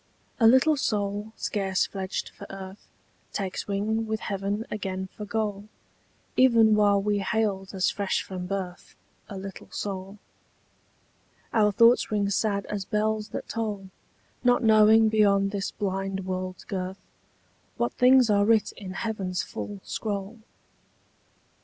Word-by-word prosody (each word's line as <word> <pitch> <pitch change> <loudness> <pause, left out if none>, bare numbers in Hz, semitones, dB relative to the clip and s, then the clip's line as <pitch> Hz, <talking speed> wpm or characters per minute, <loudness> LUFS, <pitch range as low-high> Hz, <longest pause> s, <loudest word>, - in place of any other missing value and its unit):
A 225 - +6
LITTLE 260 +6 +5
soul 205 -3 -1
scarce 190 -3 0
fledged 190 -1 -4
for - - -12
earth 195 0 -9 0.5
Takes 195 0 -3
wing 215 +3 -1
with 220 0 -2
heaven 200 +2 -2
again 190 -2 -4
for 210 - -6
goal 205 -1 -2 0.7
Even 230 -4 +5
while 205 -1 +4
we 205 +1 0
hailed 195 -1 -1
as 185 -1 +2
fresh 200 -2 -1
from 180 -1 -6
birth 185 -2 -5 0.3
A 200 - -6
little 195 0 -8
soul. 195 0 -5 1.4
Our 210 -2 +4
thoughts 230 +4 +5
ring 205 -2 0
sad 200 -1 0
as 205 -2 -4
bells 215 +1 -1
that - - -6
toll, 205 -4 -4 0.5
Not 245 0 +3
knowing 220 0 +6
beyond 200 -2 +3
this 200 -1 -2
blind 195 -1 -3
world's 185 0 -4
girth 190 -1 -5 0.7
What 235 0 0
things 255 0 +5
are 200 0 +4
writ 215 -1 +3
in 190 -3 -8
heaven's 195 -4 -2
full 205 -2 -7
scroll. 205 +1 -4
205 Hz, 135 wpm, -26 LUFS, 195-220 Hz, 1.4 s, A